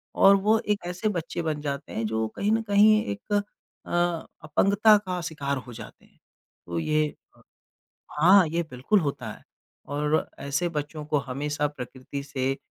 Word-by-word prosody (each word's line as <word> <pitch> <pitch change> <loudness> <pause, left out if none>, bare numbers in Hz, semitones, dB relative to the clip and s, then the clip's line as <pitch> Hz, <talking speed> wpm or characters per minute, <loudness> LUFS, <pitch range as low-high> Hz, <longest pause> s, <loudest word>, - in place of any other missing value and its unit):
और 195 - +7
वो 210 +3 +3
एक 205 -4 -2
ऐसे 180 +5 -1
बच्चे 175 -2 -3
बन 155 -2 -2
जाते 140 -1 -4
हैं 115 - -2
जो 110 +1 -1
कहीं 205 +2 0
ना 225 +1 +2
कहीं 215 +1 +5
एक 100 0 -4
अ, 205 - +4 1.0
अपंगता 200 +7 +4
का 185 -3 -4
शिकार 145 -4 -3
हो 125 -1 -9
जाते 110 -2 -11
हैं। - - -29 0.5
तो 85 -1 -3
ये 155 - +1 0.3
अ - - -21 0.8
हाँ 185 +3 +7
ये 170 +2 0
बिल्कुल 130 +12 +1
होता 140 -7 -3
है - - -15 0.4
और 150 +2 0
ऐसे 140 +5 -1
बच्चों 150 -1 -5
को 150 -1 +1
हमेशा 145 +2 -2
प्रकृति 130 0 -7
से 135 -1 -2
150 Hz, 165 wpm, -26 LUFS, 140-190 Hz, 1.0 s, और